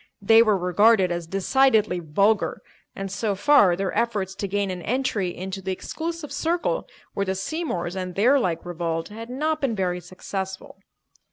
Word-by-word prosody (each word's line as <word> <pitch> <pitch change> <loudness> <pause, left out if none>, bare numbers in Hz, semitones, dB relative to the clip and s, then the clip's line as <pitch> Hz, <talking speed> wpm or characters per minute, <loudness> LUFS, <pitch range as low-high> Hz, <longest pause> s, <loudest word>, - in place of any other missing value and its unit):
They 225 +3 +6
were 215 -3 +3
regarded 190 +2 +4
as 170 -1 -3
decidedly 215 +1 +2
vulgar, 195 +7 +1 0.3
and 195 -1 -5
so 205 0 -1
far 205 -6 +5
their 195 +1 -3
efforts 210 -4 0
to 200 +1 -4
gain 200 0 -1
an 180 -1 -5
entry 220 -4 -1
into 190 +2 -6
the 190 0 -3
exclusive 325 - -5
circle 345 +9 -1 0.3
where 200 -1 -2
the 190 - 0
Seymours 190 - -3
and 185 -2 -4
their 250 +8 +4
like 170 -8 -2
revolved 165 -1 -3
had 225 +2 -9
not 305 +5 -1
been 260 -5 0
very 180 -2 -1
successful. 190 +2 -7
195 Hz, 165 wpm, -24 LUFS, 180-230 Hz, 0.3 s, They